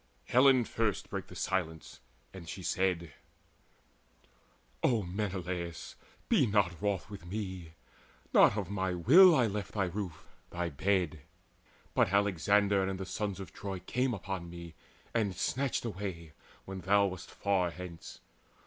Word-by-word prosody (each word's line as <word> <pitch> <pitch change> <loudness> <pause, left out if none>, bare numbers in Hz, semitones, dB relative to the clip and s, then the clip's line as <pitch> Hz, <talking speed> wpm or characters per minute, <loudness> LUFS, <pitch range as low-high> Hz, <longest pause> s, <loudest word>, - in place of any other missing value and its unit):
Helen 130 - +5
first 110 -4 -1
brake - - -4
the - - -12
silence, 80 -4 -3 0.3
and 90 -3 -9
she 95 - -6
said: 85 -4 0 1.7
"O 115 -5 +2
Menelaus, 90 -3 -4 0.3
be - - +4
not 100 -5 +1
wroth 100 -2 -1
with 100 -4 -8
me! 95 -4 -5 0.6
Not 100 - +6
of 100 - -2
my 95 -2 -1
will 165 - +8
I 125 - +4
left 105 -1 -3
thy 100 - +1
roof, 90 -2 -5 0.2
thy 85 0 -2
bed, 90 +1 0 0.7
But - - +3
Alexander 100 0 +3
and 95 0 -2
the 95 - -4
sons 100 +1 -3
of 95 - -8
Troy 100 -2 -5
Came 125 +7 -1
upon 95 -2 -5
me, 85 -1 -9 0.4
and 105 -5 0
snatched 130 +5 -1
away, 95 -7 -5 0.3
when 95 -1 -6
thou 100 +2 +4
Wast 95 -3 -5
far 95 -3 0
thence. 85 -1 -9
95 Hz, 140 wpm, -32 LUFS, 90-105 Hz, 1.7 s, will